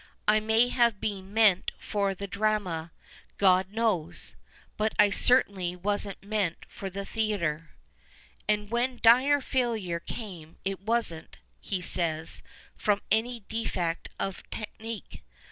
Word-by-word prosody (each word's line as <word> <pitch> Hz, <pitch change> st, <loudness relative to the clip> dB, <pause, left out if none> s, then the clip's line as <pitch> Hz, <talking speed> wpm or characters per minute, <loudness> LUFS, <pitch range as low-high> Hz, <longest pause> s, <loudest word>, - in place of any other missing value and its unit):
I 215 Hz, +1 st, +6 dB
may 220 Hz, +3 st, +3 dB
have 235 Hz, -4 st, +3 dB
been 195 Hz, -2 st, -4 dB
meant 210 Hz, -4 st, +4 dB
for 200 Hz, -2 st, -1 dB
the 200 Hz, -, -5 dB
Drama 200 Hz, -5 st, -1 dB, 0.2 s
— -, -, -25 dB
God 185 Hz, +1 st, +4 dB
knows! 215 Hz, -7 st, -1 dB, 0.2 s
— -, -, -28 dB
btit 215 Hz, +1 st, +1 dB
I 205 Hz, -1 st, +6 dB
certainly 200 Hz, -8 st, +2 dB
wasn't 200 Hz, +1 st, -2 dB
meant 200 Hz, -4 st, -1 dB
for 195 Hz, -, -6 dB
the 200 Hz, +1 st, -5 dB
Theatre." 170 Hz, -9 st, -1 dB, 0.8 s
And 210 Hz, 0 st, +1 dB
when 245 Hz, +2 st, 0 dB
dire 260 Hz, +5 st, +6 dB
failure 225 Hz, -10 st, -1 dB
came, 170 Hz, -5 st, -8 dB
it 195 Hz, -1 st, -1 dB
wasn't, 215 Hz, -7 st, -1 dB, 0.2 s
he 185 Hz, -3 st, -3 dB
says, 160 Hz, -2 st, -1 dB, 0.3 s
from 205 Hz, -1 st, +1 dB
any 230 Hz, +2 st, +1 dB
defect 185 Hz, -6 st, -2 dB
of 195 Hz, -1 st, -3 dB
tech 215 Hz, -2 st, -6 dB
nique. 225 Hz, -1 st, -7 dB
205 Hz, 135 wpm, -28 LUFS, 185-225 Hz, 0.8 s, I